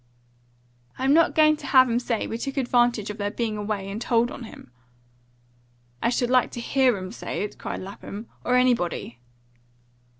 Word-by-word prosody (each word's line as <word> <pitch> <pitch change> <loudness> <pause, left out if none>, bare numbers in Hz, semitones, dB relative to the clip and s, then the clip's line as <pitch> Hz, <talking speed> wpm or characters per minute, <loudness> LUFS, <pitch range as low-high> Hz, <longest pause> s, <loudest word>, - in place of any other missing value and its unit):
"I'm 265 +2 +2
not 330 +2 +4
going 310 -1 +5
to - - -9
have 260 -2 +6
'em 235 0 +1
say 240 -2 -2
we 225 - -5
took 275 +3 -5
an - - +3
advantage 240 -4 +1
of 210 - -10
their 205 0 -1
being 225 0 -2
away 205 -2 -3
and 200 +3 -5
tolled 240 0 +1
him - - -8
on." 220 - -12 1.3
"I - - +2
should 245 0 0
like 255 -1 +4
to - - -5
HEAR 255 -1 +2
'em 185 0 -6
say 215 - -4
it!" 210 - -7
cried - - -5
Lapham. 200 +3 -8 0.2
"Or 250 - +1
anybody!" 230 - +1
235 Hz, 185 wpm, -25 LUFS, 210-255 Hz, 1.3 s, have